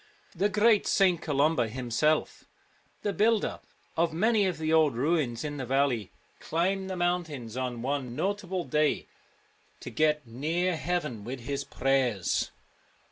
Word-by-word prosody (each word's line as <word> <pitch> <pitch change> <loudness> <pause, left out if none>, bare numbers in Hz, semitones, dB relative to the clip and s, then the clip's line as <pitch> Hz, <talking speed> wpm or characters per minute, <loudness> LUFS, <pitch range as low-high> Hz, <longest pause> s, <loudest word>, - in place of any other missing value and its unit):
The 195 +4 +2
great 210 0 +4
St. 185 -4 +3
Columba 145 -3 +2
himself, 130 +6 0 0.6
the 205 - 0
builder 215 +3 +2 0.4
of 165 0 +2
many 210 +4 +2
of 185 - -2
the 160 0 -1
old 155 -5 +4
ruins 135 -3 0
in 145 -1 -4
the 130 - -4
valley, 130 -6 +1 0.3
climbed 190 +4 -1
the 190 - -3
mountains 165 -10 -2
on 125 -2 -3
one 130 -2 -2
notable 190 +2 -2
day 150 -2 +1 0.7
to - - -8
get 150 -2 +1
near 160 +10 -1
heaven 155 -10 -2
with 125 +3 -6
his 140 +3 -3
prayers. 130 -10 0
155 Hz, 135 wpm, -28 LUFS, 130-180 Hz, 0.7 s, great